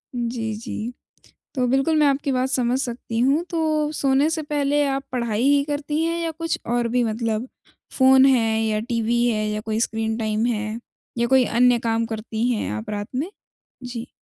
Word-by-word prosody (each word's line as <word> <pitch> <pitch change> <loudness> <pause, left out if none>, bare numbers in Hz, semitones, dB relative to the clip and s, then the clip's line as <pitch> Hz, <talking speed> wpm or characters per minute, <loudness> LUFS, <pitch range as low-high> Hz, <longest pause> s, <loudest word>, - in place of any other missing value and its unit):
जी, 230 -2 -2
जी। 230 +1 -5 0.6
तो 255 -2 +1
बिल्कुल 270 +5 +2
मैं 300 - +5
आपकी 280 0 0
बात 255 0 0
समझ 255 -1 +1
सकती 235 -2 -4
हूँ। 275 +7 +3
तो 310 -3 0
सोने 275 +1 +2
से 320 0 -2
पहले 290 -1 +1
आप 275 0 -1
पढ़ाई 235 -4 -1
ही 280 +1 +4
करती 295 +2 -2
हैं 335 +1 0
या 330 - -1
कुछ 330 +1 -3
और 240 0 0
भी 245 +1 +1
मतलब 225 +1 -2 0.5
फ़ोन 265 0 +7
है 225 -4 +3
या 215 -1 0
टीवी 235 +1 0
है 215 -3 0
या 210 0 -2
कोई 220 0 -2
स्क्रीन 225 -1 -1
टाइम 220 0 0
है? 215 -1 -2 0.4
या 235 0 +1
कोई 260 0 +4
अन्य 245 +1 +3
काम 230 0 0
करती 225 +1 -2
हैं 215 - -2
आप 105 +1 -5
रात 205 0 -3
में? 295 +8 -2 0.5
जी। 245 -1 -6
245 Hz, 185 wpm, -23 LUFS, 225-275 Hz, 0.6 s, फ़ोन